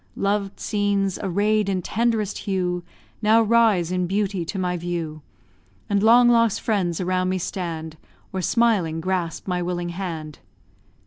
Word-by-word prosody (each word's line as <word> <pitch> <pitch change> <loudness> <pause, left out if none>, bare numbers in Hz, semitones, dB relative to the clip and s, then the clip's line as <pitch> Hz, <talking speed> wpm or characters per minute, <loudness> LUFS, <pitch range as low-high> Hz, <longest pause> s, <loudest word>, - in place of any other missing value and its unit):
Loved 200 0 -1
scenes, 200 -2 0
array'd 205 +2 +1
in 185 -2 -1
tenderest 225 -1 0
hue, 180 -3 -2 0.4
Now 220 +1 +5
rise 215 -6 +3
in 180 -1 0
beauty 195 -1 -1
to 195 - -5
my 180 -1 -1
view; 170 -3 -4 0.7
And 200 -1 +2
long 240 +3 +6
lost 230 -3 +3
friends 185 -7 0
around 185 0 0
me 185 - 0
stand, 165 -3 -4 0.4
Or, 190 - -2
smiling, 190 -6 +2
grasp 175 -1 -2
my 180 -1 -1
willing 175 0 -2
hand. 165 -4 -5
185 Hz, 140 wpm, -23 LUFS, 175-210 Hz, 0.7 s, long